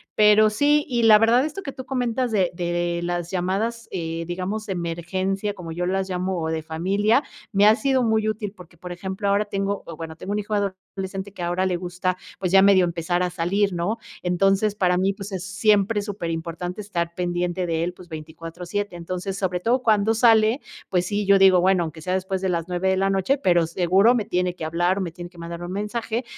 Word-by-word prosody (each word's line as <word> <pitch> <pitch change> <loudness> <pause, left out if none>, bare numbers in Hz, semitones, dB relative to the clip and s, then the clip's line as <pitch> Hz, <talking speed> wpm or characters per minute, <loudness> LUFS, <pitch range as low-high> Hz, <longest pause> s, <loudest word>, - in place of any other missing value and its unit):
pero 215 0 +6
sí 290 +6 +3
y 240 -3 0
la 220 -1 +8
verdad 230 +4 +4
esto 315 +6 -4
que 275 - -5
tú 260 - -9
comentas 250 -2 -1
de 190 -4 +2
de 175 0 -1
las 175 -1 -2
llamadas, 200 +6 -2
eh, 165 -2 -3
digamos, 195 +5 -4
emergencia, 185 +3 -2
como 170 -3 -8
yo 175 +2 -2
las 190 +1 -1
llamo, 185 0 -2
o 160 - -2
de 160 0 -2
familia, 195 - +1 0.3
me 200 0 +4
ha 215 - +7
sido 265 0 +1
muy 220 -1 +1
útil, 210 -1 -4
porque, 180 -1 -15
por 180 +1 -8
ejemplo, 190 +3 -4
ahora 200 +1 +2
tengo 200 -1 -2
o 165 - -8
bueno, 160 -1 -7
tengo 190 +5 -7
un 210 - 0
hijo 210 +1 -5
adolescente 190 0 -4
que 180 - -9
ahora 175 +2 0
le 180 - 0
gusta, 180 +1 -2 0.2
pues, 185 -2 -1
ya 195 0 +7
medio 195 -2 +6
empezar 175 +1 -1
a 180 - 0
salir, 190 +3 0
¿no? 175 +6 -1 0.3
Entonces 195 +3 +2
para 180 -3 +2
mí, 190 +2 +1
pues, 200 0 -8
es 185 -2 -4
siempre 205 +2 +2
súper 200 -5 -4
importante 170 +4 -4
estar 170 -4 -3
pendiente 175 0 -1
de 165 0 0
él, 175 +1 -2
pues, 180 -1 -14
24/7. 165 +5 -6
Entonces 185 +3 -4
sobre 180 -2 -1
todo 245 +6 +1
cuando 215 -1 +3
sale, 225 +2 +4 0.3
pues 180 -1 +1
sí, 205 0 -1
yo 200 0 +6
digo: 190 -2 +6
"Bueno 185 -1 +3
aunque 160 0 -7
sea 180 +3 -2
después 190 0 -2
de 190 - 0
las 170 -1 -1
9 180 +1 0
de 190 - +2
la 195 +1 +2
noche, 195 +9 +1
pero 175 -9 +3
seguro 190 +8 +3
me 220 - -1
tiene 180 -1 -1
que 155 - -5
hablar 175 +4 +1
o - - -1
me 175 -3 -3
tiene 175 +1 -9
que 175 - -16
mandar 170 +1 -6
un 175 - -5
mensaje". 220 +4 -3
190 Hz, 220 wpm, -23 LUFS, 175-210 Hz, 0.3 s, la